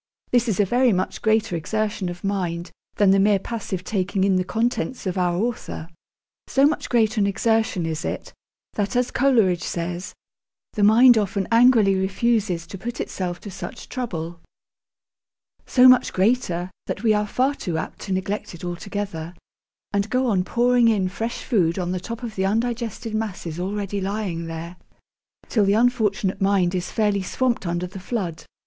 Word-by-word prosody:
This 245 0 +3
is 205 - -1
a 205 - +5
very 245 +4 +3
much 185 -1 -1
greater 220 -4 +2
exertion 205 +2 -2
of 175 0 -8
mind 180 -4 -2 0.2
than 200 -2 +4
the 195 - +4
mere 205 +1 +4
passive 195 -3 -5
taking 190 -1 -1
in 195 -1 +3
the 185 - +2
contents 235 +5 -2
of 185 -1 -1
our 180 -2 +1
Author. 215 -6 -3 0.6
So 275 +1 +3
much 300 +1 0
greater 220 -2 +2
an 200 - +3
exertion 220 -3 +1
is 160 +1 -3
it, - - -5 0.4
that, 205 +3 -2
as 245 0 +1
Coleridge 225 -10 +3
says, 175 +1 -4 0.6
the 210 - -2
mind 225 +3 +7
often 200 -1 -1
'angrily 230 -4 +5
refuses' 190 -2 0
to 190 +2 -9
put 240 +3 -5
itself 175 -2 -3
to 205 - -8
such 190 +1 -8
trouble 175 -9 -4 1.3
so 255 0 +6
much 255 -1 +5
greater, 185 -4 +1 0.2
that 195 - -4
we 220 -2 +4
are 210 0 0
far 260 +6 +1
too 175 - -4
apt 160 - -5
to - - -6
neglect 190 0 -2
it 170 - -13
altogether, 175 -2 -5 0.6
and 200 +1 0
go 255 +3 +1
on 200 -7 +2
pouring 240 +4 +3
in 200 -5 +2
fresh 225 +5 -4
food 175 -8 +1
on 180 -1 -2
the 185 - -2
top 230 +5 -7
of 230 -3 -5
the 190 - -1
undigested 230 +1 -2
masses 185 -7 -4
already 200 +1 -3
lying 190 -4 -3
there, 165 +2 -7 0.7
till 215 - +2
the 200 0 +3
unfortunate 215 -5 +1
mind 195 -2 +2
is 180 -1 -2
fairly 205 -2 +1
swamped 235 +1 -1
under 175 +1 -1
the 190 +2 -8
flood. 185 -5 -4
200 Hz, 170 wpm, -23 LUFS, 180-230 Hz, 1.3 s, mind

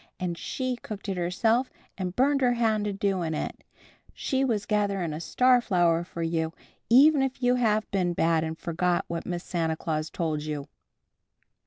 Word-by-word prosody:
And 180 -2 -2
She 255 +7 -3
cooked 210 -3 -8
it 190 - -2
herself 220 +8 +1 0.3
and 185 -1 -4
burned 275 +2 +3
her 245 -1 +4
hand 220 -3 +1
a 205 - -2
doing 190 -5 -1
it. - - -5 0.5
She 270 -1 0
was 220 -6 0
gathering 200 -6 0
a 155 - -5
star 250 +5 +4
flower 175 -6 +2
for 170 -1 -6
you, 165 -1 -1 0.4
even 280 +4 +6
if 265 -1 -2
you 245 0 +4
have 220 -3 +2
been 180 -3 +1
bad 165 -1 +2
and 160 0 -4
forgot 175 +1 0
what 170 -1 -4
Miss 175 -1 -3
Santa 165 -2 -1
Claus 155 -1 -2
told 155 -3 -2
you!" 150 -2 -4
185 Hz, 175 wpm, -27 LUFS, 165-240 Hz, 0.5 s, even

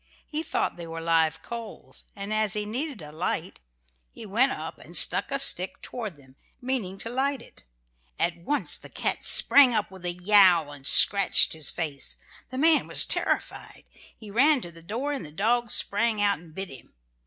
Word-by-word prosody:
He 305 +1 -4
thought 325 - -3
they 170 -1 -9
were 165 0 -8
live 160 -1 0
coals, 230 -2 -9
and 200 +2 -6
as 215 -1 0
he 210 -1 -2
needed 250 - -6
a 150 - -11
light 155 - -5 0.5
he - - -12
went 230 +7 +1
up - - -8
and - - -3
stuck - - +3
a 275 - -2
stick 265 -9 +1
toward 215 -10 -8
them, 135 -1 -22 0.2
meaning 245 -8 -4
to 225 - -5
light 270 +2 -2
it. 230 - -16 0.5
At 170 0 -1
once 240 +13 +1
the - - -14
cat - - -3
sprang 265 -4 +6
up 205 - -2
with 190 -1 -14
a 175 - -2
yowl 180 -4 +4
and 140 -1 -10
scratched 200 -2 +6
his 155 -2 +2
face. 150 -5 -4 0.3
The 255 - -8
man 315 +3 +2
was - - +6
terrified. - - -3 0.3
He 215 -3 -13
ran 275 +5 +2
to 175 - -9
the 165 0 -16
door 240 - -5
and 275 - -6
the 155 - -10
dog 230 +7 -1
sprang 215 +2 +1
out 205 -1 0
and 160 -2 -18
bit 195 0 -6
him. 130 - -15
205 Hz, 190 wpm, -25 LUFS, 170-245 Hz, 0.5 s, sprang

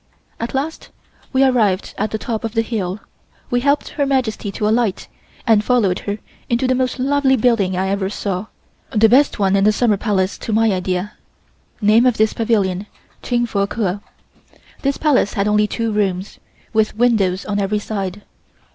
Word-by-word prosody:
At 230 +3 -4
last 295 +4 -3 0.4
we 265 0 +3
arrived 220 -8 +2
at 215 +2 -1
the 220 - -3
top 225 0 -4
of 225 0 -4
the 225 - +2
hill. 210 -4 -3 0.5
We 245 - +2
helped 285 +3 +1
Her 285 - -1
Majesty 240 -6 -1
to 210 - -1
alight 220 -3 0 0.4
and 220 -3 +4
followed 210 -7 +2
her 205 - -2 0.3
into 240 +2 +1
the 255 - +2
most 255 0 -1
lovely 270 0 +2
building 215 -7 +2
I 190 +1 0
ever 195 -1 -1
saw, 200 0 -3 0.4
the 225 -2 +4
best 270 +6 +4
one 195 -2 +2
in 195 - +3
the 210 - +5
Summer 215 -1 +2
Palace 195 -3 -1
to - - -5
my 220 0 +3
idea 185 +1 -2 0.7
(name 220 +4 +5
of 245 - +2
this 220 0 +2
pavilion, 205 -4 0 0.3
Ching 240 -1 0
Fo 200 -3 -1
Ker). 200 -3 -2 0.8
This 275 0 0
Palace 290 -9 +2
had 200 0 +1
only 210 0 +3
two 230 +1 -2
rooms, 195 -2 -2 0.3
with 215 -1 +1
windows 205 -6 +2
on 205 -1 -1
every 200 +1 0
side. 205 -2 -4
215 Hz, 175 wpm, -19 LUFS, 200-240 Hz, 0.8 s, the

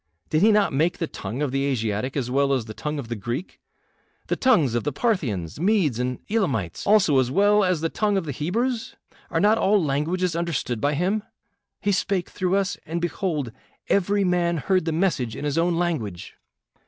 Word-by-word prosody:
Did 155 - +2
he 220 +2 +6
not 210 -6 +3
make 160 +6 +1
the 170 - -1
tongue 120 -1 -5
of 140 - -1
the 135 +1 0
Asiatic 115 0 -1
as 125 -3 -2
well 140 +1 +2
as 130 -4 0
the 110 - -8
tongue 150 +6 -4
of 135 -5 -5
the 120 - -3
Greek; 120 - -5 0.7
the - - +2
tongues 175 - +3
of 120 - 0
the 145 - -1
Parthians, 130 - -1
Medes, 175 - +2
and 125 0 -1
Elamites 135 - -1
also, 195 -9 +5
as 125 -2 +1
well 205 +6 +4
as 180 -4 +1
the 165 - 0
tongue 205 +1 0
of 190 - -1
the 145 - -3
Hebrews? 225 - -2 0.3
Are 165 - 0
not 210 +4 +4
all 205 +2 +4
languages 165 +5 0
understood 165 -9 -2
by 145 +1 +1
him? 190 +7 0 0.6
He 205 - +1
spake 195 -2 -1
through 185 0 0
us, 195 -1 0
and 165 +2 -3
behold, 170 - -2 0.4
every 200 +1 +2
man 175 -2 +1
heard 185 +3 +1
the 165 - 0
message 155 - 0
in 150 - -5
his 145 +2 0
own 170 +1 +2
language. 150 - -3
165 Hz, 200 wpm, -24 LUFS, 135-195 Hz, 0.7 s, he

